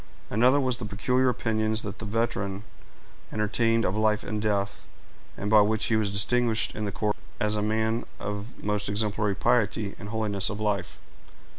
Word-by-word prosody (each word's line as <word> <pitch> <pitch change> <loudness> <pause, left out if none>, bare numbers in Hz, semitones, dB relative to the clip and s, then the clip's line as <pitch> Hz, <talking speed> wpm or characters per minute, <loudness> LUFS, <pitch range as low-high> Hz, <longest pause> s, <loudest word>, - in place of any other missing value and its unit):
Another 125 +6 +4
was 130 -3 0
the 120 - -6
peculiar 125 +6 +1
opinions 110 -2 0
that 105 -1 -6
the 115 - -5
veteran 100 -2 -1 0.7
entertained 115 +1 +1
of 95 - 0
life 110 -1 +2
and 105 -1 -3
death, 100 -2 -1 0.5
and 105 +2 -3
by 110 -1 +8
which 110 +1 +2
he 110 - +2
was 110 -2 +1
distinguished 115 +3 +1
in 105 - -3
the 100 - -2
corps 105 +1 0 0.3
as 105 0 +1
a 105 - 0
man 110 +2 0
of 105 +4 -6
most 105 -1 -1
exemplary 105 -1 0
piety 110 -3 +1
and 100 - -7
holiness 105 -3 0
of 105 - -5
life. 100 -4 -1
105 Hz, 170 wpm, -27 LUFS, 105-115 Hz, 0.7 s, by